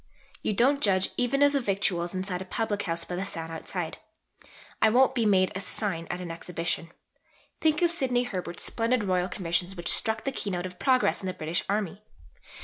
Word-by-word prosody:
You - - 0
don't 270 +7 +3
judge 190 -4 +2
even 275 +3 +2
of 285 - +6
the 280 -1 +1
victuals 190 -4 0
inside 185 -1 -2
a - - -5
public 210 +1 -1
house 165 -2 -2
by 180 - -4
the 185 - -2
sign 165 -4 -5
outside. 165 +1 -4 0.8
I - - +6
won't 260 +4 +5
be 235 -4 +2
made 185 -2 +4
a 190 - -4
sign 185 -4 -3
at 180 - -3
an 175 -2 -5
Exhibition. 165 0 -3 0.7
Think 315 +2 +2
of 340 - +4
Sidney 255 -7 +1
Herbert's 180 -7 -4
splendid 230 0 +1
Royal 185 -2 +1
Commissions 175 0 -1
which 175 -1 +1
struck 220 0 +2
the 270 - -1
keynote 185 -8 -3
of 180 -1 -8
progress 255 -4 +3
in 190 - -4
the 185 - -3
British 160 +2 -2
Army! 200 -1 -1
195 Hz, 195 wpm, -28 LUFS, 175-240 Hz, 0.8 s, of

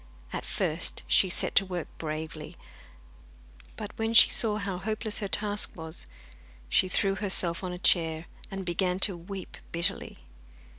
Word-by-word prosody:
At - - -4
first - - -2
she 190 - +3
set - - -2
to - - +5
work 180 -3 -5
bravely, 155 0 -6 1.2
but 210 0 -7
when 225 +1 -1
she - - +9
saw 215 -2 +1
how 200 -3 -4
hopeless 215 +2 -1
her 205 - -3
task 205 +1 +1
was, 160 - -7 0.6
she 185 - +2
threw 195 +1 +1
herself 190 -3 +4
on 185 - -4
a 180 - -6
chair, 165 -3 +2 0.2
and 195 -1 -6
began 180 +1 -1
to 195 -2 +4
weep 185 +2 -9
bitterly. 170 0 +2
185 Hz, 150 wpm, -28 LUFS, 170-205 Hz, 1.2 s, she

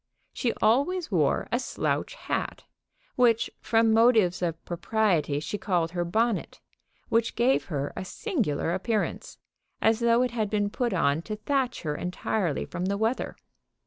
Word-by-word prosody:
She 245 - 0
always 285 +11 +2
wore - - +2
a - - +2
slouch - - -2
hat, - - -3 0.5
which 235 -3 +3
from 225 -1 +3
motives 220 -6 +4
of 165 -2 -3
propriety 175 -5 0
she 160 +7 -4
called 175 -4 0
her 175 0 -1
bonnet, 220 +5 0 0.5
which 230 0 +1
gave 255 +3 +2
her 145 -4 -3
a - - -4
singular 195 - -1
appearance, 210 +3 -2 0.4
as 225 0 +3
though 235 +1 +4
it 250 - -1
had 220 -3 -1
been 205 -1 0
put 240 +1 -1
on 160 -4 +1
to 215 +5 -5
thatch 255 +3 -1
her 150 -2 -1
entirely 180 -1 -2
from 180 - -4
the 200 +1 0
weather. 225 +4 -1
215 Hz, 150 wpm, -27 LUFS, 175-235 Hz, 0.5 s, motives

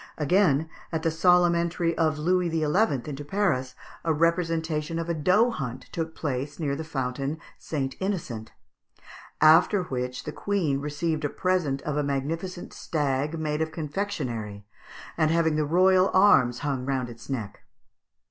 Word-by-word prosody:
Again, 160 -1 +3 0.2
at 160 -1 -2
the 165 - +2
solemn 175 +1 +4
entry 170 0 0
of 155 -2 +1
Louis 180 +3 +1
XI. 165 -1 -1 0.4
into 145 -1 -5
Paris, 145 -7 0 0.3
a 165 - +1
representation 165 -1 0
of 165 0 -3
a - - +1
doe 185 +10 +3
hunt 130 - -6
took 160 -1 -4
place 140 0 -3
near 145 -4 -1
the 160 - -5
fountain 135 0 -3 0.2
St. 135 -4 -3
Innocent; 160 - -3 0.9
"after 165 +5 +6
which 125 -4 -4
the - - -5
queen 175 -9 -1
received 150 +2 -2
a 145 - 0
present 175 -8 0
of 150 -1 -2
a 150 - +1
magnificent 165 +6 -3
stag, 145 0 -1
made 155 -1 -2
of 160 0 -1
confectionery, 145 - -4 0.5
and 155 -1 +3
having 160 -1 +2
the 155 0 +1
royal 185 +4 +4
arms 140 -12 +5
hung 135 -3 -1
round 130 -2 -1
its 120 +2 -12
neck." 110 -7 -4
155 Hz, 150 wpm, -26 LUFS, 140-170 Hz, 0.9 s, after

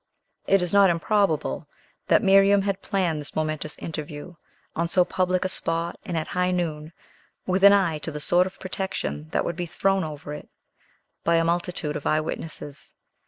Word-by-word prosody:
It 195 -2 +4
is 180 - -1
not 200 -1 +6
improbable 170 - 0 0.4
that - - +4
Miriam 195 0 +5
had 195 -1 -2
planned 180 -7 -1
this 145 - -9
momentous 155 -1 -2
interview, 155 +1 -7 0.4
on 170 +1 0
so 180 +1 +3
public 185 0 0
a - - +3
spot 170 -2 -1
and 180 -5 -3
at 155 - -3
high 180 0 0
noon, 160 -4 -2 0.5
with 190 +1 0
an 200 - +10
eye 175 -6 +2
to 155 - -5
the 150 -1 -6
sort 175 +4 +3
of 190 - -11
protection 185 - -3
that - - 0
would 170 - -2
be 175 0 -4
thrown 195 +3 +1
over 150 -1 -6
it - - -9 0.7
by 170 - +3
a 165 0 +3
multitude 170 -3 -1
of 150 - -3
eye 155 - +3
witnesses. 155 -2 -6
170 Hz, 180 wpm, -25 LUFS, 155-190 Hz, 0.7 s, an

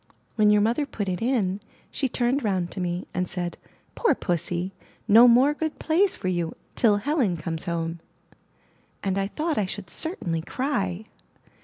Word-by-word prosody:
When 215 -2 +4
your 210 0 +5
mother 240 +7 +1
put 205 -7 -4
it 180 -2 -2
in, 220 -6 +1 0.3
she 270 - -1
turned 245 +3 0
round 185 -5 0
to - - -6
me, 175 0 -2
and 180 -1 -1
said, 175 -1 -3 0.4
*Toor 385 - +3
pussy, 175 0 -2 0.3
no 230 +4 +8
more 255 +5 +6
good 315 0 -3
plays 360 +5 +2
for - - -5
you 175 -3 -1 0.2
till 215 -4 +4
Helen 245 - +1
comes 160 0 -4
home!*' 170 -1 -2 1.0
and 195 0 0
I 195 - 0
thought 310 +5 -1
I 200 - 0
should 190 -1 -7
certainly 175 - -2
cry. 210 - -2
205 Hz, 165 wpm, -25 LUFS, 175-255 Hz, 1.0 s, no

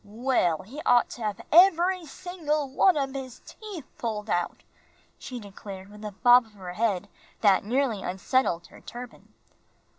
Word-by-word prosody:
"Well, 210 -6 0
he 265 +10 -9
ought 245 -1 +4
to 240 - -9
hab 210 -2 -3
eb'ry 355 0 +5
single 305 -3 -3
one 310 +6 +3
ob 270 -2 -1
his 260 -3 -7
teef 405 -10 -9
pulled 215 -2 -3
out," 175 0 -1 0.6
she 250 -2 -7
declared, 195 -2 -10
with 210 +1 -12
a 210 - -5
bob 245 +3 +5
of 220 - -23
her 185 -3 -8
head 205 -2 0 0.3
that 200 -3 +4
nearly 235 -1 0
unsettled 185 -1 0
her - - -16
turban. 245 0 -10
240 Hz, 155 wpm, -27 LUFS, 205-280 Hz, 0.6 s, eb'ry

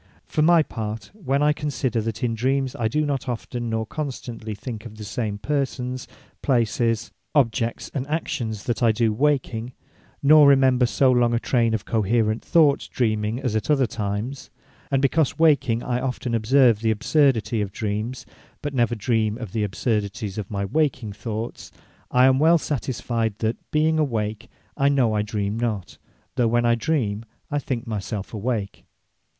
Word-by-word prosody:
For 155 - -1
my 165 +1 +6
part, 110 -4 -6
when 145 -9 -1
I 150 0 +4
consider, 135 -6 -1
that 115 +3 -4
in 120 -2 +1
Dreames, 130 +2 0
I 115 - +2
do 150 +7 0
not 140 -2 -2
often, 120 0 -4
nor 110 0 -1
constantly 120 -6 -5
think 110 +1 -7
of 110 - -13
the 110 - -7
same 105 0 -3
Persons, 130 -1 -2 0.3
Places, 115 -3 +1 0.2
Objects, 115 -4 +1
and 135 -1 -3
Actions 135 -9 -3
that 120 -1 -2
I 115 -2 +5
do 110 0 +1
waking; 125 -2 0 0.5
nor 150 +1 +8
remember 130 -3 +5
so 130 +2 +3
long 120 -1 +3
a - - +1
trayne 115 -2 +1
of 110 - -4
coherent 110 0 +1
thoughts, 150 -4 +3
Dreaming, 110 -2 -1
as 125 -6 -1
at 110 - -2
other 140 -3 +4
times; 110 +5 -4 0.4
And 135 -1 +1
because 140 +1 +2
waking 140 -8 +3
I 125 0 -1
often 125 -2 -3
observe 115 0 +4
the 110 0 0
absurdity 115 0 +2
of 100 -1 -3
Dreames, 110 +5 -3 0.4
but 145 -1 -3
never 120 -2 +1
dream 110 0 0
of 115 -6 -7
the 110 -1 -1
absurdities 105 0 -2
of 100 - -5
my 100 -1 -2
waking 130 -3 0
Thoughts; 110 +2 -6 0.4
I 125 +1 +5
am 130 0 +4
well 165 +3 +6
satisfied, 120 -7 -2
that 110 +1 0
being 155 +1 +2
awake, 115 -5 -2 0.3
I 140 -1 +3
know 130 -6 +2
I 105 - +1
dreame 105 0 -2
not; 105 -7 -3 0.4
though 120 - +3
when 120 +1 +2
I 120 - +4
dreame, 115 -4 -1 0.3
I 145 - +1
think 130 -3 -3
my 110 -3 -3
selfe 100 +1 -6
awake. 110 -2 -3
120 Hz, 170 wpm, -23 LUFS, 110-135 Hz, 0.5 s, nor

